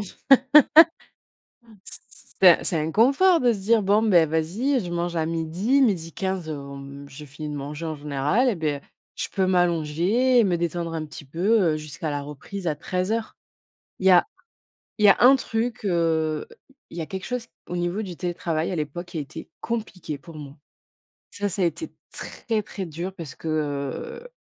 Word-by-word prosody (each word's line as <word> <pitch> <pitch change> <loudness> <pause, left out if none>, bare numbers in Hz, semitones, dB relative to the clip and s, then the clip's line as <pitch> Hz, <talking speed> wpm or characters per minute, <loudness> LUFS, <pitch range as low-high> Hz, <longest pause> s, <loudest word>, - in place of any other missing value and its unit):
c 205 - -8 1.7
c - - +2 0.4
c'est 180 -3 +7
un - - -8
c'est 165 - +2
un 155 +1 -2
confort 280 - +4
de 245 -2 +3
se 200 - -5
dire: 220 +2 +2
«Bon, 205 +3 +3
beh, 180 -7 +5
vas-y, 190 - 0
je 175 - -6
mange 175 0 -2
à 160 -1 0
12:00, 170 - +1
12:15, 190 -3 -1
hem, 140 -1 -8
j'ai 145 +2 -11
fini 150 +3 -8
de 150 - -5
manger 145 +3 -6
en 160 - -3
général, 150 - +1
et 225 - 0
beh, 150 -4 -2 0.3
je - - -3
peux 190 -1 +1
m'allonger 180 +8 +2
et - - +6
me 180 -4 +1
détendre 170 0 -2
un 155 - -3
petit 150 0 -10
peu, 190 +10 +2
heu, - - -2
jusqu'à 155 +1 -5
la 145 -1 -3
reprise 155 +7 -8
à 155 - +1
13:00». 185 +8 -3 0.6
Il 190 - +1
y - - +8
a 180 - +6 0.7
il 210 - +5
y - - +8
a 195 - +7
un 260 +3 +8
truc, 230 -3 -3
heu, 160 -3 0 0.4
il 170 - -8
y - - -2
a 160 - -4
quelque 190 -1 -6
chose 250 -2 -4 0.2
au 180 - -4
niveau 175 +4 -1
du 185 -4 -6
télétravail 170 -2 -2
à 180 - -2
l'époque 155 +4 -4
qui 175 - -10
a - - -1
été 140 - -10
compliqué 195 -10 -4
pour 165 +1 -13
moi. 145 -1 -10 0.7
Ça, 205 0 -2
ça 195 0 -1
a - - +4
été 310 - -3 0.2
très, 220 -2 -3
très 195 -1 -6
dur 170 +3 -5
parce 165 -8 -8
que, 160 - -6 0.7
heu, - - -11
175 Hz, 190 wpm, -24 LUFS, 155-205 Hz, 1.7 s, y